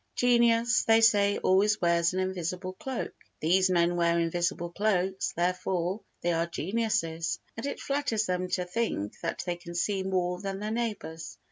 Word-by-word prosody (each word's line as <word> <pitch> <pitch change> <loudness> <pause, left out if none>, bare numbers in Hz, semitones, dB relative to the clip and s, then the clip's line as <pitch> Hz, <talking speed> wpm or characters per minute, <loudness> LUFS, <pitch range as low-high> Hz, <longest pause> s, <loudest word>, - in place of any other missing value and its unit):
Genius, 235 -1 +3
they 225 0 +6
say, 205 -3 +4
always 200 +3 +3
wears 170 -1 +2
an 185 - -2
invisible 185 0 -3
cloak; 260 +6 -5 0.3
these 185 +4 +3
men 175 -1 +2
wear 170 -1 +2
invisible 170 0 -1
cloaks—therefore 185 -1 0 0.2
they 175 - +1
are 165 +1 0
geniuses; 170 -3 -1 0.2
and 225 +5 -4
it - - -4
flatters 275 -6 0
them 180 -1 -1
to 180 0 -1
think 180 - -2
that 170 - -3
they 175 -1 -2
can 170 0 -10
see 195 +2 0
more 180 -1 -1
than 195 -1 -3
their 210 +2 -4
neighbours. 215 -8 -4
185 Hz, 155 wpm, -28 LUFS, 175-215 Hz, 0.3 s, they